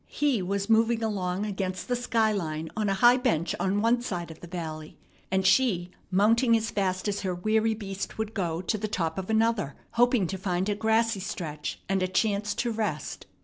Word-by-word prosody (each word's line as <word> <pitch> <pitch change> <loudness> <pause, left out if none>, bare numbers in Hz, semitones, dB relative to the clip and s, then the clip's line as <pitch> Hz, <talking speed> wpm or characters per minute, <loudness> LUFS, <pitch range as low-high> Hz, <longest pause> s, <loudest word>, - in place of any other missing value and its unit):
He 280 -8 +1
was 200 +2 -2
moving 225 +1 +3
along 195 -2 -1
against 190 -2 -3
the 250 - +1
sky 230 -3 +1
line 160 -5 -3
on 215 -2 0
a 195 - +1
high 240 +5 +6
bench 170 -9 0
on 195 +2 +1
one 235 +1 +3
side 175 -8 -4
of 160 - -12
the 175 - -9
valley, 160 -3 -6 0.3
and 190 0 +1
she 190 -4 +3 0.2
mounting 230 +5 +4
as 225 0 -3
fast 185 -1 -1
as 200 0 -1
her 185 -2 -2
weary 220 +4 +1
beast 195 -2 -6
would 220 0 -3
go 175 -4 -2
to 215 +3 -1
the 215 - -2
top 165 -4 -2
of 190 - -6
another, 220 -8 +1 0.2
hoping 245 -3 +3
to 190 +2 -4
find 185 +1 -1
a - - +2
grassy 220 0 +2
stretch 155 -5 -5
and 195 -1 +1
a 185 - +2
chance 205 +1 0
to 240 - -1
rest. 210 - -3
200 Hz, 200 wpm, -27 LUFS, 180-225 Hz, 0.3 s, high